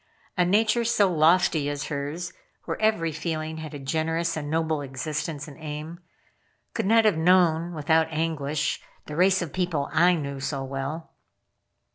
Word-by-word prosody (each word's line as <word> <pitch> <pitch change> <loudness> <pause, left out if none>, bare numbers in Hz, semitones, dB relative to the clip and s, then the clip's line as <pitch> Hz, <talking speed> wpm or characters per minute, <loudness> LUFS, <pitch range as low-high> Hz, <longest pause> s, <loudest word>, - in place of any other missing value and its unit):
A 180 - +3
nature 215 +6 +3
so 210 -5 +3
lofty 160 -2 +3
as 145 0 -4
hers, 145 +4 -4 0.3
where - - -4
every 215 -7 +2
feeling 155 0 -3
had 155 -1 -7
a - - -4
generous 160 +4 -1
and 145 -2 -4
noble 160 -1 0
existence 145 +2 -4
and 150 +1 -12
aim, 155 +2 -6 0.7
could - - -1
not 225 +1 +5
have 205 -7 +4
known 170 0 +3
without 160 +1 +2
anguish 155 -2 -1 0.2
the 150 - -7
race 185 +2 +3
of 165 - -8
people 175 -6 -1
I 175 +2 +5
knew 140 -3 -4
so 135 0 -3
well. 135 +4 -5
160 Hz, 155 wpm, -26 LUFS, 150-175 Hz, 0.7 s, not